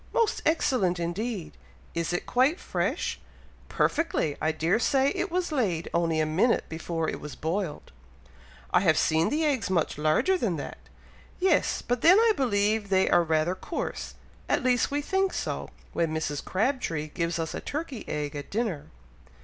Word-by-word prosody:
"Most 455 -1 +1
excellent 235 - +2
indeed!" 185 +3 -3 0.4
"Is 170 0 -1
it 175 - -2
quite 265 +8 +2
fresh?" - - -2 0.5
"Perfectly! 240 - +1
I 155 - +2
dare 165 +6 +1
say 270 +2 +3
it 390 - -2
was 355 -1 -1
laid 195 - -1
only 165 -2 +1
a 155 - +2
minute 180 +10 +2
before 165 0 -3
it - - -4
was 150 - -7
boiled!" 165 0 -3 0.8
"I - - +5
have 170 -4 +3
seen 160 +1 +2
the 310 +2 +1
eggs 260 -10 0
much 170 -5 0
larger 155 - +2
than 195 - 0
that." 145 - -6 0.6
"Yes! 365 -4 +2
but 245 0 -1
then 355 +4 +7
I 450 0 +5
believe 210 - +1
they 190 -1 +3
are - - +6
rather 160 +1 +1
coarse, 185 - -5 0.3
at - - +1
least 250 -2 +2
we 290 +1 -1
think 385 +3 +1
so, - - -3 0.2
when 165 -2 0
Mrs. 150 -2 -2
Crabtree 190 - -1
gives 170 +1 -2
us 160 -1 -3
a - - -3
turkey 290 -5 -5
egg 150 -1 -3
at 145 - -6
dinner." 210 -9 -2
190 Hz, 165 wpm, -27 LUFS, -, 0.8 s, then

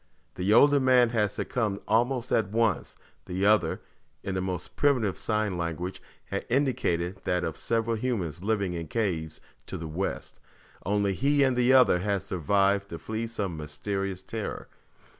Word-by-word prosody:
The 90 +3 -1
older 145 +6 +6
man 130 -2 +5
had 110 -3 +1
succumbed 105 -1 -2
almost 120 +2 +1
at 105 -3 +2
once; 110 -7 0 0.3
the 95 +2 -1
other, 105 -6 +3 0.4
in 95 - -3
the 95 - -1
most 90 -1 -4
primitive 125 -9 +2
sign 105 -4 -1
language, 85 +2 -4 0.2
had - - -3
indicated 95 -9 0
that, 90 0 0
of 80 - -2
several 115 +3 0
humans 95 - -3
living 100 -4 0
in 85 -2 -5
caves 80 -6 -2 0.3
to - - -5
the 80 - -6
west, 85 +5 -4 0.5
only 100 0 +1
he 140 +6 +2
and 130 -2 +2
the 125 +1 +4
other 125 -9 +6
had 100 0 -1
survived 100 +2 +1
to 85 - -6
flee 110 +8 -4
some 100 -6 -3
mysterious 95 +5 -4
terror. 110 +1 -5
100 Hz, 160 wpm, -27 LUFS, 90-115 Hz, 0.5 s, older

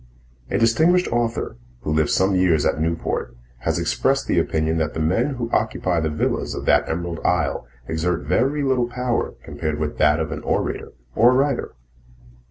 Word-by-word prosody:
A - - 0
distinguished 160 +11 +3
author, 115 - -1 0.2
who 80 - -2
lived 75 -1 +2
some 95 +1 +2
years 90 -5 +3
at 75 - +1
Newport, 80 -6 -2 0.2
has - - -1
expressed - - +1
the - - +2
opinion 80 +1 0
that 80 -1 -2
the - - -2
men 105 - +1
who 120 -2 -3
occupy 95 -5 0
the 80 -1 0
villas 75 - -1
of - - -5
that - - +3
emerald 85 0 -3
isle 85 -6 0 0.2
exert 80 0 -1
very 130 - +1
little 130 -3 +1
power 125 0 -2
compared 75 -2 -3
with 75 -1 -3
that 75 +1 +4
of 80 -1 -2
an 75 - -4
orator - - -2 0.2
or 120 - +5
a 125 - +3
writer. 135 - 0
90 Hz, 180 wpm, -22 LUFS, 80-120 Hz, 0.2 s, or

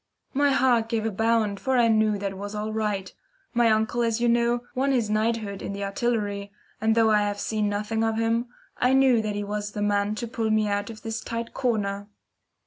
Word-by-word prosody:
My 285 +1 +3
heart 255 -5 +3
gave 225 -2 -1
a 225 - 0
bound, 220 -1 +1
for 265 -1 0
I 235 -1 +5
knew 215 -2 +3
that 200 -1 -3
all 190 - -10
was 205 +1 -6
right. 210 -2 -2 0.4
My 240 -1 +4
uncle, 220 +2 +1
as 230 -1 +1
you 240 - +2
know, 235 +1 +2
won 270 +2 +1
his 230 -5 0
knighthood 215 -2 -1
in 200 - -4
the 200 0 -4
Artillery, 200 -1 -2 0.3
and 220 0 +2
though 225 -1 +4
I 210 - +5
have 205 0 -2
seen 210 -1 -1
nothing 210 +2 -1
of 225 0 +1
him, 230 +1 +1 0.3
I 250 +1 +3
knew 265 -3 +5
that 210 -1 -3
he 205 - -2
was 205 0 -4
the 205 - -4
man 205 0 +1
to 235 +2 -4
pull 225 -1 -2
me 215 -1 +2
out 205 +1 -1
of 220 -1 -10
this 225 0 -4
tight 230 0 -5
corner. 205 -5 -1
220 Hz, 220 wpm, -25 LUFS, 205-235 Hz, 0.4 s, I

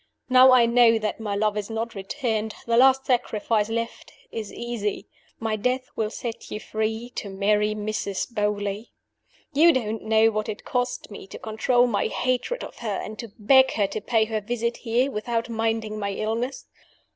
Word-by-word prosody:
Now 255 +1 +8
I 250 -2 +6
know 235 -1 +5
that 215 0 -3
my 210 -2 -3
love 210 0 +1
is 210 0 -3
not 225 +1 -3
returned, 215 +2 -3
the 235 - +1
last 265 +2 +5
sacrifice 225 -3 +1
left 230 +1 -4 0.2
is 220 -3 -5
easy. 220 -4 -3 0.3
My 225 -1 -1
death 255 +5 -1
will 220 -1 -1
set 235 0 -6
you 210 - -4
free 220 +3 -3
to 205 - -5
marry 210 +2 +1
Mrs. 210 +1 -3
Beauly. 205 0 -2 0.6
"You 325 +4 +6
don't 225 -6 -2
know 220 0 +4
what 215 0 -2
it 210 - -6
cost 245 -3 -2
me 200 - -9
to - - -9
control 240 +3 +2
my 230 -5 0
hatred 255 - -1
of - - -9
her, 215 -4 -2
and 215 0 -8
to 230 -3 -7
beg 260 +4 +5
her 205 - +2
to 215 - -4
pay 225 -3 +2
her 220 -1 -2
visit 235 +2 -2
here, 245 +3 0
without 230 +1 -2
minding 225 -1 -1
my 200 -1 -2
illness. 225 +6 -3
225 Hz, 180 wpm, -25 LUFS, 210-240 Hz, 0.6 s, Now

